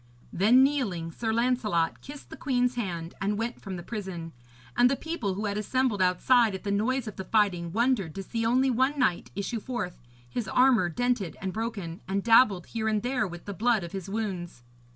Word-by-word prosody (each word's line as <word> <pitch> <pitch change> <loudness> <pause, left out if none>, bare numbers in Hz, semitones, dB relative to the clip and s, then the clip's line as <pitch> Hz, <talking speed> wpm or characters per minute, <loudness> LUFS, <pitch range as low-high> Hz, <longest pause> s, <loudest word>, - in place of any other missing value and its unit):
Then, 230 +8 +5
kneeling, 210 - 0
Sir 225 +6 -2
Lancelot 220 -8 +1
kissed 285 +1 -11
the - - -6
queen's 250 -2 +1
hand, 175 -8 -4
and 205 +1 0
went 230 +2 -3
from 195 -2 -6
the 175 - -7
prison; 185 -6 -6 0.4
and 245 0 +5
the 275 - +1
people 260 - -3
who 210 +3 -3
had 205 0 -1
assembled 240 -1 0
outside 205 +4 +3
at 190 - -8
the 200 - -2
noise 235 +5 0
of 215 - -7
the 190 - -4
fighting 185 -5 +1
wondered 225 -6 +1
to 195 - -4
see 230 +4 -3
only 255 +3 +3
one 260 +4 +1
knight 215 -10 +1
issue 200 +4 -2
forth, 225 -7 -4 0.3
his 215 - -4
armour 250 -8 +4
dented 225 -4 -1
and 190 -1 -4
broken, 210 -7 -4
and 195 +1 -1
dabbled 225 -6 +5
here 220 -1 -3
and 215 -1 +1
there 250 -3 0
with 175 -1 -9
the 200 - -5
blood 225 0 +1
of 170 - -7
his 195 -1 -6
wounds. 190 - -4
215 Hz, 200 wpm, -28 LUFS, 185-245 Hz, 0.4 s, Then